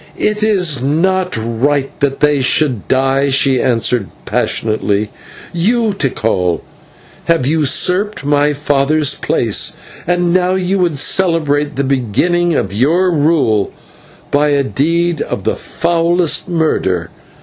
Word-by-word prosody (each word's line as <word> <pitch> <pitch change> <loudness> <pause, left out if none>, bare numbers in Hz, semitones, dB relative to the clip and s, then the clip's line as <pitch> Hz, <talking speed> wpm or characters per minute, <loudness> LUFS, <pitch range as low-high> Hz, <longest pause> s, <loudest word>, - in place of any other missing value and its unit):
"It 210 0 -1
is 180 - +2
not 180 +5 0
right 130 +5 -1
that 140 -1 -1
they 150 -2 +2
should 130 -3 +1
die," 135 +1 +1
she 135 -1 +2
answered 120 -3 0 0.2
passionately. 105 -1 -1 0.4
"You, 220 +6 +1
Tikal, 110 - -1 0.6
have 165 -6 +1
usurped 160 +6 +1
my 145 0 +2
father's 145 0 +1
place, - - 0 0.3
and 175 0 +1
now 185 0 +2
you 190 +1 -1
would 170 -5 0
celebrate 150 -3 +1
the 140 - -1
beginning 145 - 0
of - - -2
your 165 - +2
rule 145 - +1 0.6
by 145 +1 +2
a 140 -1 +2
deed 165 +4 0
of - - -4
the - - -1
foulest 170 +1 0
murder. 95 - -1
150 Hz, 120 wpm, -14 LUFS, 135-175 Hz, 0.6 s, is